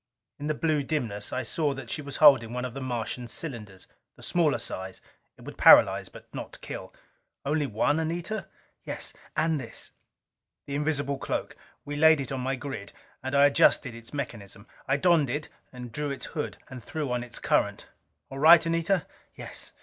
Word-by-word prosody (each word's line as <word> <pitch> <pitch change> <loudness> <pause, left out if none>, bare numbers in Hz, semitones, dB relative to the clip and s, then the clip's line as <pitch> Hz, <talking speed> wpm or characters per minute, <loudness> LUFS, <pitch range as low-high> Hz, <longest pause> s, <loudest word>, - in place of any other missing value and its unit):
In 145 - -4
the 155 - 0
blue 155 -1 +1
dimness 120 -9 -3
I 130 - -2
saw 145 +4 0
that 135 -3 -8
she 150 - -2
was 140 -1 -7
holding 130 -7 +6
one 125 0 -2
of 125 - -5
the 135 - -6
Martian 120 -1 -3
cylinders. 110 - -6 0.3
The - - -15
smaller 165 -4 +2
size: 95 0 -5 0.4
it - - -16
would - - -10
paralyze - - +7
but - - -14
not - - -7
kill. - - -7 0.5
"Only 150 0 +1
one, 135 +7 +1
Anita?" 170 +6 -3 0.4
"Yes. - - -5 0.2
And 155 -2 +1
this 115 - -8 0.4
" - - -62
The 140 - -6
invisible 145 -2 -1
cloak. - - -3 0.3
We 145 - -4
laid 160 0 +6
it 135 -2 -4
on 135 - -2
my 135 +2 -1
grid, 125 -7 -7 0.3
and 130 +2 -3
I 140 0 +7
adjusted 140 -2 +4
its 115 0 -11
mechanism. 110 -8 -6 0.2
I 135 - +2
donned 160 -3 +3
it 145 +4 -3 0.2
and 125 -2 -9
drew 150 +4 -3
its 140 - -4
hood, 150 - -4
and 130 -2 -9
threw 150 +2 -4
on 125 0 -1
its 125 -1 -6
current. - - 0 0.5
"All 135 - -6
right, 165 +3 +8
Anita?" 165 +1 +1 0.3
"Yes." - - -8
140 Hz, 185 wpm, -27 LUFS, 125-155 Hz, 0.5 s, right